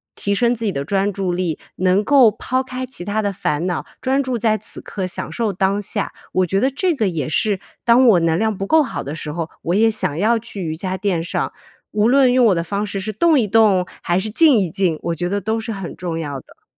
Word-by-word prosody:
提 200 Hz, -, -1 dB
升 240 Hz, +3 st, +2 dB
自 230 Hz, -, -7 dB
己 205 Hz, -, +1 dB
的 140 Hz, -5 st, -4 dB
专 195 Hz, +4 st, 0 dB
注 185 Hz, -2 st, -2 dB
力， 175 Hz, -3 st, -2 dB, 0.2 s
能 185 Hz, +2 st, +2 dB
够 255 Hz, -2 st, +6 dB
抛 255 Hz, +5 st, -2 dB
开 255 Hz, 0 st, -5 dB
其 255 Hz, -8 st, -6 dB
他 210 Hz, +1 st, -1 dB
的 200 Hz, -1 st, -1 dB
烦 165 Hz, -3 st, -1 dB
恼， 175 Hz, -2 st, -2 dB, 0.2 s
专 270 Hz, +2 st, +1 dB
注 255 Hz, -2 st, -2 dB
在 220 Hz, -1 st, +2 dB
此 -, -, -9 dB
刻 190 Hz, -, -5 dB
享 180 Hz, -, -4 dB
受 230 Hz, -3 st, -1 dB
当 195 Hz, +2 st, 0 dB
下。 205 Hz, 0 st, -3 dB, 0.2 s
我 185 Hz, 0 st, +2 dB
觉 195 Hz, +2 st, 0 dB
得 265 Hz, +2 st, +2 dB
这 340 Hz, +5 st, 0 dB
个 220 Hz, -7 st, +1 dB
也 160 Hz, -6 st, -3 dB
是 200 Hz, +4 st, +1 dB, 0.3 s
当 245 Hz, +2 st, +5 dB
我 205 Hz, -6 st, +6 dB
能 165 Hz, -1 st, +2 dB
量 220 Hz, -2 st, 0 dB
不 195 Hz, -, -3 dB
够 320 Hz, +5 st, +5 dB
好 245 Hz, -, -5 dB
的 140 Hz, -, -5 dB
时 155 Hz, -2 st, -5 dB
候， 165 Hz, 0 st, -4 dB
我 175 Hz, -, 0 dB
也 225 Hz, +2 st, +4 dB
想 155 Hz, -8 st, -1 dB
要 225 Hz, +5 st, +2 dB
去 205 Hz, -3 st, -6 dB
瑜 160 Hz, -1 st, -3 dB
伽 185 Hz, +3 st, -3 dB
垫 190 Hz, -3 st, -1 dB
上， 170 Hz, -, -2 dB, 0.4 s
无 210 Hz, +1 st, +2 dB
论 260 Hz, -1 st, +5 dB
用 250 Hz, -1 st, +4 dB
我 195 Hz, -, +3 dB
的 170 Hz, -, -1 dB
方 200 Hz, +5 st, -2 dB
式， 200 Hz, -1 st, -4 dB
是 215 Hz, +3 st, -3 dB
动 315 Hz, -, +3 dB
一 230 Hz, -, +2 dB
动 205 Hz, -3 st, +4 dB, 0.2 s
还 175 Hz, 0 st, 0 dB
是 215 Hz, +3 st, -3 dB
静 295 Hz, +4 st, +5 dB
一 190 Hz, -4 st, +1 dB
静， 170 Hz, -1 st, 0 dB
我 170 Hz, -1 st, -1 dB
觉 175 Hz, +2 st, -2 dB
得 200 Hz, 0 st, -1 dB
都 220 Hz, +3 st, -1 dB
是 225 Hz, +1 st, -5 dB
很 195 Hz, -4 st, -6 dB
重 170 Hz, -2 st, -4 dB
要 145 Hz, -4 st, -4 dB
的。 -, -, -21 dB
200 Hz, 275 characters per minute, -20 LUFS, 180-230 Hz, 0.4 s, 够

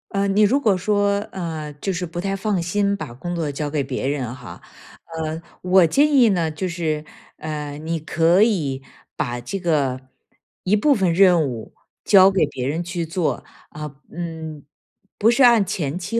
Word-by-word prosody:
呃， 200 Hz, 0 st, 0 dB
你 200 Hz, +2 st, +2 dB
如 225 Hz, +7 st, +4 dB
果 220 Hz, -8 st, +2 dB
说， 200 Hz, +1 st, +1 dB
呃， 160 Hz, -5 st, -5 dB
就 195 Hz, -, -2 dB
是 180 Hz, +1 st, -3 dB
不 175 Hz, +1 st, -6 dB
太 195 Hz, +2 st, -2 dB
放 195 Hz, -2 st, -1 dB
心 200 Hz, +3 st, 0 dB
把 120 Hz, -, -7 dB
工 175 Hz, +8 st, -6 dB
作 165 Hz, -3 st, -2 dB
交 145 Hz, +1 st, -3 dB
给 145 Hz, 0 st, -1 dB
别 130 Hz, -1 st, -4 dB
人 130 Hz, -4 st, -2 dB
哈， 125 Hz, -3 st, -11 dB, 0.6 s
呃， 160 Hz, +1 st, -4 dB, 0.2 s
我 180 Hz, -1 st, +5 dB
建 290 Hz, -, +3 dB
议 255 Hz, -4 st, +6 dB
呢， 170 Hz, -5 st, 0 dB
就 185 Hz, +5 st, -3 dB
是， 160 Hz, -3 st, -2 dB, 0.3 s
呃， 150 Hz, -2 st, -5 dB
你 160 Hz, +2 st, -3 dB
可 165 Hz, +4 st, +3 dB
以 155 Hz, -, 0 dB, 0.3 s
把 120 Hz, 0 st, -3 dB
这 195 Hz, +11 st, -5 dB
个 145 Hz, -8 st, 0 dB, 0.6 s
一 190 Hz, +3 st, +2 dB
部 280 Hz, +8 st, +3 dB
分 190 Hz, -8 st, +1 dB
任 180 Hz, -1 st, +5 dB
务 115 Hz, -4 st, -7 dB, 0.3 s
交 195 Hz, -2 st, +7 dB
给 190 Hz, -5 st, +2 dB
别 130 Hz, -3 st, -4 dB
人 160 Hz, +5 st, -2 dB
去 175 Hz, -1 st, -3 dB
做， 165 Hz, 0 st, -2 dB, 0.2 s
啊， 150 Hz, -1 st, -8 dB, 0.2 s
嗯， 160 Hz, -3 st, -6 dB, 0.5 s
不 220 Hz, +2 st, +4 dB
是 260 Hz, +3 st, +3 dB
按 235 Hz, -4 st, +6 dB
前 165 Hz, -4 st, -3 dB
期、 200 Hz, +6 st, -2 dB
170 Hz, 195 characters per minute, -21 LUFS, 150-195 Hz, 0.6 s, 交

